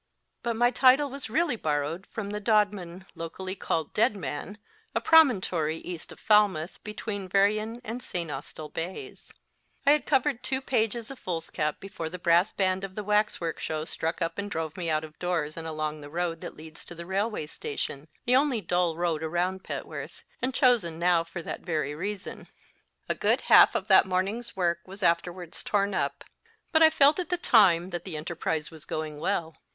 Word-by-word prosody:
But 235 -1 -1
my 240 +2 +3
title 265 +3 +5
was 275 -4 -6
really 300 +4 +1
borrowed 155 0 -2
from 205 -2 -5
the 210 - -3
Dodman, 200 -4 +1
locally 185 +3 -5
called 160 -5 -2
Deadman, 210 - -1 0.4
a - - +3
promontory 185 - +4
east 170 -1 -7
of - - -12
Falmouth, 205 -6 +2
between 210 -2 -5
Veryan 215 +4 +2
and 235 +3 -5
St. 170 -9 -3
Austell 150 +2 -7
bays, 170 +3 -6 0.5
I 285 - +7
had 300 0 +2
covered 270 -2 +2
two 260 +1 -1
pages 235 -2 -1
of 270 - -10
foolscap 165 -3 -2
before 190 -5 -6
the 180 - -6
brass 175 +2 +3
band 190 -1 0
of 195 -1 -6
the 210 - -4
waxwork 210 -5 0
show 155 -1 -3
struck 165 +2 -2
up 165 +3 -3
and 205 0 -3
drove 160 -4 -3
me 175 -3 -2
out 155 0 +1
of 155 -1 -11
doors 165 -4 -1
and 165 -1 -5
along 155 -1 -3
the 145 - -9
road 170 +1 -2
that - - -8
leads 155 0 -11
to 175 - -9
the 170 +1 -7
railway 200 -1 -1
station 145 -1 -5 0.2
the 250 - +4
only 270 -3 +3
dull 175 -3 0
road 170 -3 0
around 175 +4 -1
Petworth, - - -6 0.2
and 255 - 0
chosen 230 - +3
now 170 -1 +3
for 170 +1 -7
that - - -5
very 155 -5 -2
reason. 195 +5 -5 0.6
A - - +1
good - - +1
half - - +7
of 190 - -1
that 190 -1 +7
morning 190 +4 0
s 240 -1 -10
work 170 -3 +1
was 195 +2 -8
afterwards 175 0 0
torn 200 -1 0
up; - - -1 0.5
but 320 - +4
I 320 - +9
felt 300 +1 +5
at 365 - -3
the 355 - +1
time 190 - +4
that 175 -1 -4
the 175 -5 -5
enterprise 160 -1 -3
was 160 -2 -12
going 155 -2 -4
well. 165 -2 -1
185 Hz, 190 wpm, -28 LUFS, 165-215 Hz, 0.6 s, I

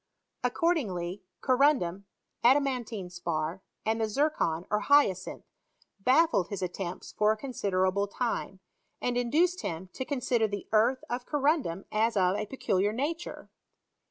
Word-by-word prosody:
Ac 250 -1 0
cordingly 200 - 0 0.2
corundum, 255 - +2 0.4
adamantine 245 -7 +2
spar, 170 0 -3 0.2
and 225 +1 +1
the - - +3
xtr 285 +8 +1
con, 165 +1 -1
or 210 - +3
hyacinth, 210 -8 +2 0.6
baffled 255 - +3
bis 200 -2 -4
attempts 180 0 -5
for 210 0 +3
a 220 - -1
con^derft 195 -7 0
ble 200 +1 0
time, 200 -4 -3 0.4
and 245 -1 -1
induced 315 +10 +2
liim 180 - -5
to - - -4
consider 250 -5 +1
the 205 -1 -5
earth 230 +4 +3
of 245 +1 -4
corundum 285 - 0
as 220 +1 +1
of 185 0 +3
a 210 0 -3
peculiar 205 -6 0
nature. 300 +9 -4
220 Hz, 140 wpm, -29 LUFS, 190-265 Hz, 0.6 s, the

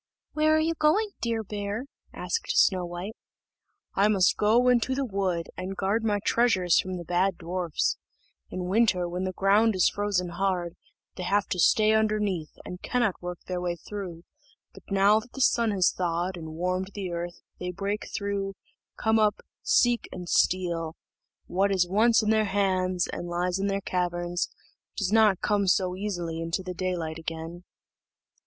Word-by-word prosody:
"Where 310 0 +3
are - - +3
you 325 +1 +1
going, 380 +8 +2
dear 230 -1 -1
Bear?" 205 +3 -4 0.3
asked 460 - -2
Snow 185 -2 +4
white. 175 +5 -6 0.8
"I 200 +2 +3
must 195 -4 +3
go 230 +4 +3
into 250 +1 +3
the 275 0 -1
wood, 190 -6 -2
and 190 +1 -5
guard 205 +4 0
my 210 -2 +1
treasures 210 -8 +3
from 185 0 -2
the 175 - -6
bad 180 +2 +1
dwarfs; 175 -2 -1 0.5
in 185 -1 -4
winter, 185 -2 +2
when 180 +2 -3
the 185 - -1
ground 200 +4 +3
is 185 - +4
frozen 200 -3 -1
hard, 175 -1 -1 0.4
they - - -5
have 200 +3 +1
to 180 - -2
stay 215 +5 +4
underneath, 210 -7 0 0.2
and 180 - -8
cannot 240 -6 0
work 180 -1 -6
their 180 -1 -3
way 175 -1 -1
through, 175 -2 -7 0.5
but - - -13
now 200 +2 +4
that 240 +3 -14
the - - -8
sun 235 -3 +3
has 190 -4 +3
thawed 175 +1 -2
and 160 -2 -8
warmed 185 +2 -1
the 190 -3 -4
earth, 175 +1 -5 0.2
they 180 - -3
break 200 +3 -3
through, 200 -1 -3 0.4
come 220 0 +2
up, 210 -1 +2 0.2
seek, 240 -1 +2
and 180 -1 -7
steal: 170 -3 +1 0.5
what 195 +2 +1
is 185 -2 +2
once 220 +5 +4
in 215 - +2
their 220 -1 +3
hands, 185 -2 +1
and 175 - -5
lies 175 +2 -1
in 200 - 0
their 195 0 -1
caverns, 175 -1 -1 0.5
does 195 -3 -1
not 215 -4 +4
come 205 -2 +1
so 185 0 +2
easily 175 -5 -3
into 165 +3 -2
daylight 180 -3 -3
again." 165 +2 -6
190 Hz, 170 wpm, -27 LUFS, 180-210 Hz, 0.8 s, Snow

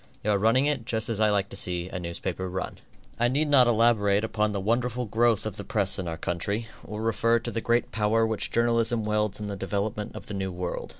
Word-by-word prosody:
You 105 - +1
are 100 - +3
running 115 +6 +3
it 145 -6 0
just 110 +1 -2
as 110 -2 -2
I 110 - +5
like 100 -1 +1
to - - -7
see 90 -1 -2
a 95 - -5
newspaper 90 +1 -4
run. 95 +1 -4 0.4
I 120 - +4
need 145 +5 +1
not 130 -4 +6
elaborate 110 -3 +3
upon 105 -1 0
the 100 - -2
wonderful 120 +4 0
growth 115 +1 +2
of 110 -2 -4
the 100 - -5
press 100 -1 0
in 90 - -3
our 80 -1 -3
country, 100 +8 -2 0.2
or 105 +1 -6
refer 115 +1 +2
to 120 +1 -4
the 115 - -2
great 120 +1 +1
power 110 +1 +2
which 110 -2 -1
journalism 115 -1 +2
wields 105 -1 0
in 105 - -4
the 100 -1 -4
development 100 +2 -3
of - - -8
the - - -7
new 95 -1 -2
world. 90 0 -4
105 Hz, 235 wpm, -27 LUFS, 100-115 Hz, 0.4 s, not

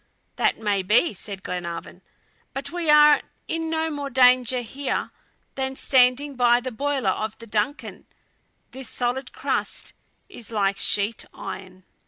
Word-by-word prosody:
"That - - +2
may 205 -3 0
be," 215 - +3
said 195 0 -7
Glenarvan, 170 -2 -6 0.5
"but 270 - -4
we 340 -2 -2
are 300 0 +7 0.3
in 325 0 -2
no 320 0 -1
more 285 -2 -4
danger 250 -1 +4
here 270 +4 -3 0.4
than 265 0 -3
standing 265 +2 +3
by 240 -1 +4
the 255 +1 -5
boiler 280 +2 0
of 215 0 -4
the 230 - -11
DUNCAN; 220 +6 -3 0.6
this 265 -1 -8
solid 250 +2 -2
crust - - -3 0.3
is 245 - -9
like 200 -3 0
sheet 205 +2 +1
iron." 185 0 -8
250 Hz, 140 wpm, -24 LUFS, 215-280 Hz, 0.6 s, are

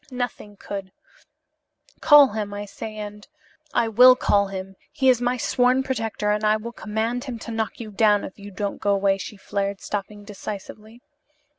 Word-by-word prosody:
Nothing 245 -5 -5
could 195 -2 -7 1.1
Call 295 -3 +7
him, 205 -1 -4
I 205 0 -5
say, 215 +2 -8
and 210 -1 -8 0.2
" 310 -1 -34
"I 230 - +3
will 250 +3 +7
call 200 -5 +2
him. 195 0 -7 0.2
He 275 -4 +2
is 245 -2 +4
my 245 +1 0
sworn 250 +2 +2
protector, 225 -5 -2
and 210 +1 -1
I 215 0 +3
will 230 +2 -7
command 225 +2 -3
him 250 -4 -5
to 230 - -8
knock 225 -1 -3
you 220 -3 -7
down 210 0 +3
if 190 - -9
you 200 0 -9
don't 200 +1 -4
go 200 0 +2
away," 195 0 +1
she 210 - -7
flared, 200 0 -3
stopping 205 0 -5
decisively. 210 +3 -9
215 Hz, 180 wpm, -23 LUFS, 205-245 Hz, 1.1 s, Call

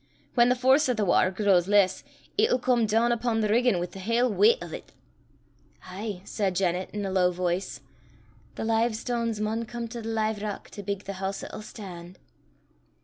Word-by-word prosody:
Whan 240 -1 +5
the 250 - +3
force 265 +3 +4
o' - - +3
the 215 -2 0
watter 185 0 +4
grows 190 -2 +2
less, 200 -2 +3 0.3
it'll 430 - +3
come 245 -2 +2
doon 225 +3 +2
upo' 235 -1 0
the 215 - +1
riggin' 240 -2 +3
wi' 175 - -1
the 180 +2 -11
haill 230 +5 +1
weicht 460 - +4
o' - - -8
't." - - -9 0.9
"Ay!" 190 0 -6
said 195 -4 -1
Janet, 180 0 0
in 205 -1 -4
a 190 - -3
low 185 -1 +3
voice, 180 +1 -2 0.7
"the - - -4
live 225 0 +1
stanes 230 -1 -2
maun 220 +2 -1
come 235 +1 -5
to 235 0 -6
the 225 - -5
live 220 -2 -1
rock 210 -1 -5
to 205 - -7
bigg 200 0 -4
the 195 -1 -7
hoose 195 0 -3
'at'll - - -7
stan'." 185 -5 -10
215 Hz, 195 wpm, -27 LUFS, 190-235 Hz, 0.9 s, Whan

